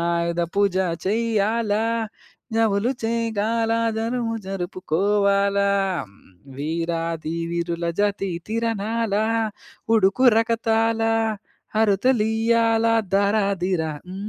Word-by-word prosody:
ఆయుధ 170 0 -1
పూజ 200 -2 +2 0.3
చెయ్యాలా, 220 0 +1 0.7
జములు 225 +1 +2
చేయగాల 225 0 0 0.3
జరువు 230 0 -1
జరుపుకోవాల, 200 +2 0 1.0
వీరాది 165 +1 -2 0.2
వీరుల 170 0 -2 0.2
జాతి 200 -1 0 0.2
తిరణాల, 225 -1 -1 0.8
ఉడుకు 215 +5 +3
రకతాల, 225 0 +1 0.8
అరుతలియాల 225 +1 +2 0.3
ధారా 200 +2 +3 0.2
ధీరా 175 -3 0 0.2
హ్మ్ 185 - -8
205 Hz, 70 wpm, -23 LUFS, 190-225 Hz, 1.0 s, ఉడుకు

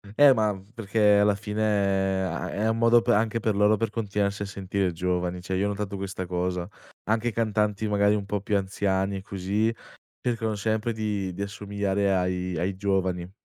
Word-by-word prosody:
Eh 145 +1 +8
ma 105 -4 +1 0.2
perché 105 -1 +3
alla 105 0 +4
fine 105 +1 -4
è 95 -2 +1
a 95 - -3
è 105 +2 -1
un 110 - 0
modo 115 +1 +5
per - - +2
anche 110 +2 +1
per 110 -2 0
loro 105 +1 +4
per 115 0 -1
continuarsi 100 -2 -1
a - - -3
sentire 100 -1 -2
giovani, 90 0 -1
cioè 95 +1 -3
io 95 - +1
ho 105 - +1
notato 100 -1 -3
questa 95 -1 -4
cosa, 90 0 -2 0.4
anche 115 +2 +1
cantanti 105 -1 0
magari 105 0 +3
un 100 -1 -3
po' 100 +1 -2
più 100 +1 -1
anziani, 95 0 -1
così, 100 +4 -1 0.5
cercano 115 -3 -1
sempre 110 +2 -1
di 105 -4 -2
di 100 - -4
assomigliare 100 -1 -1
ai 90 -1 -1
ai 95 +3 -1
giovani. 95 -2 -1
100 Hz, 185 wpm, -26 LUFS, 95-110 Hz, 0.5 s, Eh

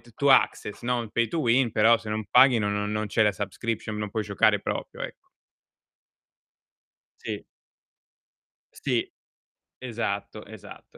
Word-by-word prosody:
t 120 - -20
to 140 -1 +2
access, 105 -5 +2
no, 125 0 0
un 115 -2 -7
pay 115 -1 +1
to 160 +8 -3
win, 120 -1 +2
però 115 +2 +5
se 110 - -10
non 110 0 -2
paghi 130 -3 +6
no 105 - 0
no 105 0 -1
non 105 0 -2
c'è 110 - +2
la 105 - +3
subscription, 105 +2 -4
non 105 -1 -4
puoi 110 - -2
giocare 100 -2 +2
proprio, - - -5
ecco. - - -8 1.9
Sì. - - -5 1.4
Sì. - - 0 0.7
Esatto, 110 -4 -4
esatto, 110 -1 -13
110 Hz, 150 wpm, -26 LUFS, 105-120 Hz, 1.9 s, paghi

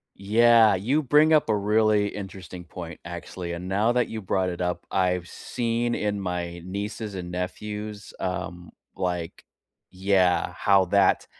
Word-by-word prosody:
Yeah, 110 +2 +5
you 125 +12 +1
bring 150 +3 +4
up 155 -5 +4
a 110 - +3
really 105 0 +2
interesting 95 -3 -8
point, 85 0 -8
actually, 85 0 -6
and 85 +2 -6
now 105 +5 +2
that 125 0 +1
you 110 - -5
brought 95 -1 0
it 90 0 -5
up, 90 0 -2
I've 90 -2 0
seen 120 0 -2
in 105 -1 -1
my 90 -2 -3
nieces 100 +3 -5
and 90 -2 -6
nephews, 105 +3 -5
um, 90 -1 -4 0.3
like, 90 -3 -3 0.5
yeah, 95 -1 +2
how 100 -2 +4
that 100 +2 +3
95 Hz, 145 wpm, -25 LUFS, 90-110 Hz, 0.5 s, Yeah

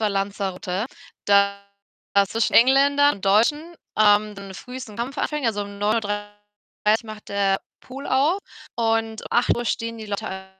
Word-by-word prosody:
war 215 - +2
Lanzarote, 195 0 -2 0.4
da 200 0 +3 0.6
zwischen 225 0 0
Engländern 280 +4 +5
und 195 - -10
Deutschen, 295 - +2 0.2
ähm, 210 0 +4
so 195 -1 -9
früh 250 +6 -8
so 245 -5 -9
'n - - -12
Kampf 250 +5 -4
anfangen. 300 -2 -2
Also 205 -2 0
um 200 0 -9
9:30 205 0 -2
macht 215 -1 -10
der 200 -1 +1 0.2
Pool 270 +2 -9
auf 290 +8 +2 0.4
und 225 -1 0
um - - -8
8 240 0 +2
stehen 230 0 -2
die 215 - -8
Leute 190 -2 -5
215 Hz, 155 wpm, -23 LUFS, 200-240 Hz, 0.6 s, Engländern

